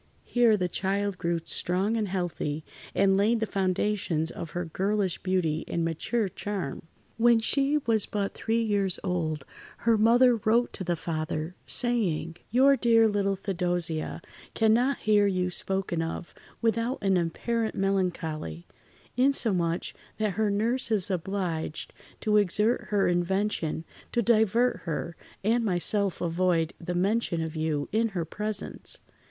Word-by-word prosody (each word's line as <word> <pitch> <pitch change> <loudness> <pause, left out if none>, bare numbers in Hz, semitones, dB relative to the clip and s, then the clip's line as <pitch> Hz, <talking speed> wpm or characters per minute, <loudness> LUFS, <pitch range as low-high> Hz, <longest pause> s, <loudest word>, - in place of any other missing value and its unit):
Here 235 -3 +4
the 180 -2 0
child 195 +1 -1
grew 170 -1 -1
strong 190 +5 0
and 215 -2 0
healthy, 175 -5 -3 0.3
and 195 0 +4
laid 215 +4 +3
the 220 - 0
foundations 185 -4 0
of 165 - -7
her 175 +3 -3
girlish 195 +2 -1
beauty 175 -4 0
and 170 -1 -1
mature 200 +7 -1
charm. 185 -6 -5 0.3
When 235 0 +5
she 275 +5 +1
was 220 -3 +3
but 200 -1 -2
three 230 +1 0
years 200 -4 +1
old 160 -6 -2 0.4
her 230 -2 +4
mother 240 +2 +5
wrote 225 +3 +1
to - - -5
the 175 -1 0
father, 155 0 -3
saying: 185 -9 +2
"Your 265 +4 +5
dear 230 -3 +4
little 200 -2 0
Theodosia 175 -4 -2 0.3
cannot 235 +5 +3
hear 210 -1 +3
you 180 -2 0
spoken 190 -2 -1
of 165 +1 -5 0.3
without 230 +3 +1
an 195 -1 +3
apparent 220 +7 -1
melancholy; 170 - -2 0.5
insomuch, 210 -11 +1 0.2
that 215 -1 0
her 215 +2 0
nurse 230 +5 0
is 205 -3 0
obliged 180 -3 -3 0.3
to 210 -1 +3
exert 210 +4 +2
her 205 0 +1
invention 175 -2 0 0.3
to 235 - +2
divert 230 +1 +3
her, 165 0 -4 0.3
and 230 +3 +2
myself 195 0 0
avoid 170 -1 +1
the 175 +1 -3
mention 195 -1 +1
of 160 0 -5
you 155 -2 -1
in 225 +2 +2
her 170 - -1
presence. 210 - -2
195 Hz, 140 wpm, -27 LUFS, 170-220 Hz, 0.5 s, When